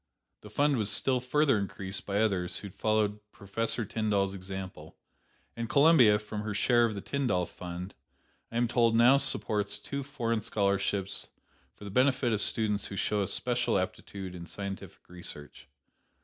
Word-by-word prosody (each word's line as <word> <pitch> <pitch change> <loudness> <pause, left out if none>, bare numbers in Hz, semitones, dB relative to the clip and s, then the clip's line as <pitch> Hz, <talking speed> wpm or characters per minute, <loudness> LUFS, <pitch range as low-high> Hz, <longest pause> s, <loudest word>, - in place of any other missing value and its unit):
The 105 - -11
fund 145 +4 +2
was 105 -3 +1
still 130 +3 +2
further 135 -1 +2
increased 100 0 -3
by 100 +1 +1
others 95 -5 +1
who 100 - -7
followed 105 0 0
Professor 115 +3 -2
Tyndall's 100 -2 0
example, 95 -4 -8 0.6
and 115 -1 -4
Columbia, 140 -7 +6
from 105 0 -6
her 105 -1 -4
share 120 +2 +4
of 110 -2 -2
the 100 - -5
Tyndall 125 -11 0
fund, 90 +2 -7 0.6
I 115 - -3
am 120 0 +2
told 115 -1 +3
now 120 +4 +7
supports 105 -7 0
two 140 0 -5
foreign 120 -5 -2
scholarships 100 -1 -1 0.5
for - - -14
the 100 - -7
benefit 130 0 +2
of 105 - 0
students 105 -3 +1
who 100 - -7
show 105 +2 0
a 95 - 0
special 120 0 0
aptitude 95 0 -4
in 85 -1 -8
scientific 95 +2 -7
research. 75 -5 -8
105 Hz, 160 wpm, -30 LUFS, 95-120 Hz, 0.6 s, now